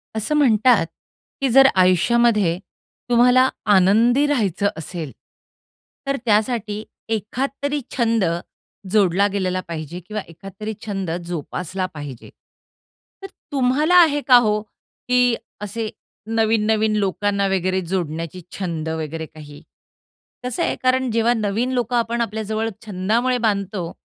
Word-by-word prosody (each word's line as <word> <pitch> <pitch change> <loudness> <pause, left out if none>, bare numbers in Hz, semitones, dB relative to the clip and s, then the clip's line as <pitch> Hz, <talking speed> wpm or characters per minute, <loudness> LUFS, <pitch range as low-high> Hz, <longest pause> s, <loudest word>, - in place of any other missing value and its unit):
असं 220 +8 -1
म्हणतात, 240 - +4 0.6
की 270 - +2
जर 270 +3 +7
आयुष्यामध्ये 190 0 +3 0.5
तुम्हाला 250 +2 +5 0.3
आनंदी 225 +9 +4
राहायचं 205 - +1
असेल, 160 -2 -6 1.0
तर 275 - +1
त्यासाठी 215 -1 0 0.3
एखादतरी 275 +7 -2
छंद 230 -3 +2 0.7
जोडला 200 -1 +3
गेलेला 185 -2 -1
पाहिजे 165 0 -6
किंवा 215 0 -4
एखादतरी 195 +5 -8
छंद 195 -4 -3 0.2
जोपासला 175 +2 -4
पाहिजे. 145 -5 -8 0.9
तर - - -5 0.2
तुम्हाला 280 +5 +2
आहे 315 -5 +6
का 250 -2 +9
हो, 210 -3 +2
की 245 +3 -1 0.3
असे 215 +2 -4 0.4
नवीन-नवीन 220 -1 +1
लोकांना 200 0 0
वगैरे 185 0 0
जोडण्याची 170 -1 -4 0.2
छंद 165 -4 -3
वगैरे 160 0 -4
काही? 150 -2 -13 0.8
कसं 250 -1 -2
आहे - - 0
कारण 255 0 +2
जेव्हा 230 +1 +2
नवीन 225 +3 -1
लोक 245 -1 -1
आपण 235 0 0
आपल्या 220 -1 -2
जवळ 220 +1 -2 0.2
छंदामुळे 220 +6 0
बांधतो, 195 -4 -2
215 Hz, 115 wpm, -21 LUFS, 185-240 Hz, 1.0 s, का